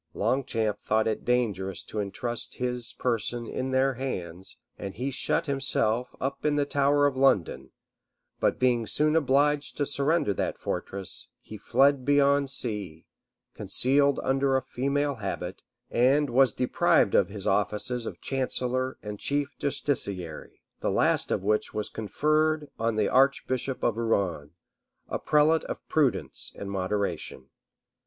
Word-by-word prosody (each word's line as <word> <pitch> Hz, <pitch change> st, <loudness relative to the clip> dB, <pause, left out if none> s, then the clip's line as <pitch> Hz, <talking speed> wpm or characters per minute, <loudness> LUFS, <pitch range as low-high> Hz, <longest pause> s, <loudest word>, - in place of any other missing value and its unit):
Longchamp 115 Hz, -5 st, 0 dB
thought 110 Hz, +1 st, +1 dB
it 110 Hz, -, -2 dB
dangerous 100 Hz, -7 st, 0 dB
to 110 Hz, -, -6 dB
intrust 120 Hz, +4 st, -3 dB
his 125 Hz, -1 st, -2 dB
person 120 Hz, 0 st, -2 dB
in 130 Hz, +3 st, -3 dB
their 130 Hz, +1 st, +2 dB
hands, 95 Hz, -9 st, -6 dB, 0.2 s
and 95 Hz, -1 st, -7 dB
he 130 Hz, +4 st, -3 dB
shut 150 Hz, -, 0 dB
himself, 125 Hz, -4 st, 0 dB
up 140 Hz, +1 st, -3 dB
in 150 Hz, -1 st, +2 dB
the 145 Hz, -1 st, +2 dB
tower 145 Hz, 0 st, +2 dB
of 140 Hz, -2 st, +1 dB
London; 85 Hz, -, +2 dB, 0.7 s
but -, -, +1 dB
being 120 Hz, -3 st, +2 dB
soon 155 Hz, +1 st, +1 dB
obliged 145 Hz, 0 st, +2 dB
to 145 Hz, -, +1 dB
surrender 140 Hz, -4 st, +2 dB
that -, -, -2 dB
fortress, 95 Hz, -1 st, -5 dB
he 110 Hz, -, -11 dB
fled 135 Hz, +5 st, +3 dB
beyond 140 Hz, 0 st, +3 dB
sea, 105 Hz, -, -5 dB, 0.5 s
concealed 140 Hz, +2 st, +2 dB
under 135 Hz, 0 st, +2 dB
a 130 Hz, -, -2 dB
female 140 Hz, +2 st, -1 dB
habit, 95 Hz, -2 st, -4 dB, 0.3 s
and 135 Hz, +3 st, +3 dB
was 130 Hz, 0 st, +5 dB
deprived 125 Hz, -, +2 dB
of -, -, +4 dB
his 100 Hz, -1 st, -6 dB
offices 105 Hz, +4 st, 0 dB
of -, -, -7 dB
chancellor 130 Hz, -1 st, 0 dB
and 105 Hz, -1 st, -6 dB
chief 145 Hz, 0 st, -1 dB
justiciary, 100 Hz, -, -3 dB, 0.2 s
the -, -, -1 dB
last -, -, +2 dB
of -, -, -1 dB
which 105 Hz, +2 st, 0 dB
was 105 Hz, 0 st, -1 dB
conferred 155 Hz, +7 st, 0 dB
on 115 Hz, 0 st, 0 dB
the 105 Hz, -2 st, +2 dB
archbishop 130 Hz, -1 st, +1 dB
of 115 Hz, -2 st, +1 dB
Rouen, 95 Hz, -10 st, -1 dB, 0.6 s
a -, -, -2 dB
prelate 155 Hz, +2 st, +3 dB
of -, -, -4 dB
prudence 145 Hz, -6 st, 0 dB
and 100 Hz, 0 st, -6 dB
moderation. 100 Hz, +1 st, -3 dB
125 Hz, 140 wpm, -27 LUFS, 105-140 Hz, 0.7 s, was